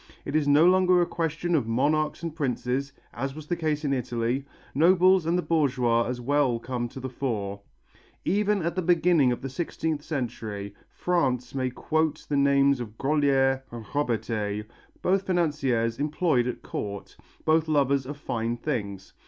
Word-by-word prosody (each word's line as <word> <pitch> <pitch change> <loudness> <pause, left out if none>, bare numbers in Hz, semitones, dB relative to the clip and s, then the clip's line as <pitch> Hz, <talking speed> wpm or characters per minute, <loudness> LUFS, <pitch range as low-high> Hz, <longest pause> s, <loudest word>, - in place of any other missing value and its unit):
It 140 - -3
is 155 -2 +2
no 145 +3 +6
longer 185 0 +5
a 175 - +3
question 165 +1 -2
of 140 -8 +2
monarchs 150 +7 +1
and 165 -2 -4
princes, 135 -1 -1 0.2
as 135 +3 -4
was 155 -1 -8
the 175 - -1
case 155 -2 -1
in 140 - +1
Italy, 125 +1 -1 0.3
nobles 180 +2 +4
and 170 +2 +2
the 180 - 0
bourgeois 125 -7 +2
as 125 0 -3
well 135 -1 +1
come 120 0 -4
to 130 - -9
the 130 - -4
fore. 105 -6 -3 0.6
Even 205 0 +1
at 170 0 -1
the 185 - 0
beginning 170 -5 +3
of 120 - -3
the - - -2
sixteenth 160 +1 -3
century, 110 -9 -4 0.2
France 130 -9 0
may 130 -1 -1
quote 155 +4 -1
the 145 - -1
names 140 -1 +4
of 110 -2 -7
Grolier 135 -2 +2
and 115 -2 -8
Robertet, 110 -6 -1 0.4
both 195 +1 +1
financiers 135 -10 0
employed 150 -4 +1
at 125 - -5
Court, 100 -1 -6 0.3
both 160 0 +3
lovers 140 -3 +2
of 145 +1 -6
fine 115 -3 -2
things. 100 -8 -4
140 Hz, 165 wpm, -26 LUFS, 120-160 Hz, 0.6 s, no